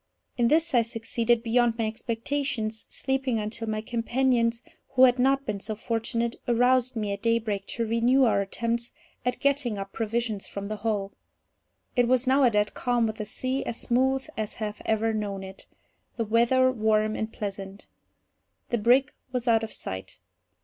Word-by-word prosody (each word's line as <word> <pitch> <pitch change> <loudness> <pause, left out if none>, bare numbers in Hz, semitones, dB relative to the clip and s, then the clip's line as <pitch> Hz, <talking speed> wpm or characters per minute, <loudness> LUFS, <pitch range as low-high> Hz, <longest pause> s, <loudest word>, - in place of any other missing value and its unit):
In 240 -2 +2
this 320 +4 +2
I 240 - +6
succeeded 230 0 0
beyond 235 0 +2
my 225 - 0
expectations, 225 0 -3
sleeping 265 -3 -1
until 215 +1 -3
my 215 0 -1
companions, 235 0 +1 0.3
who 260 -1 +5
had 250 -1 +6
not 270 +2 +3
been 210 -2 -2
so 215 +2 -5
fortunate, 230 +1 -2
aroused 250 +1 +3
me 210 -2 -2
at 200 - -6
daybreak 220 -4 0
to 230 - -2
renew 235 +4 +3
our 225 -4 +3
attempts 235 +4 -2 0.3
at 250 0 -1
getting 280 -6 +1
up 195 0 -6
provisions 225 -2 -2
from 200 0 -6
the 215 +1 -4
hull. 205 -2 -1 0.8
It 245 -1 +3
was 255 +1 +3
now 265 +2 +4
a 255 - +6
dead 210 -1 +1
calm, 245 -2 +1
with 220 0 -3
the 215 - -4
sea 255 +5 -2
as 230 - -4
smooth 265 +2 +1
as 215 -1 -4
I 220 - -5
have 210 0 -6
ever 220 0 +1
known 200 -2 -3
it,—the 190 +4 -9
weather 240 +4 +4
warm 215 -2 +1
and 220 0 -3
pleasant. 195 -2 -6 0.9
The 240 - +1
brig 255 +6 +4 0.2
was 250 -1 -3
out 225 -1 +4
of 225 - -5
sight. 95 0 -6
230 Hz, 170 wpm, -27 LUFS, 215-250 Hz, 0.9 s, I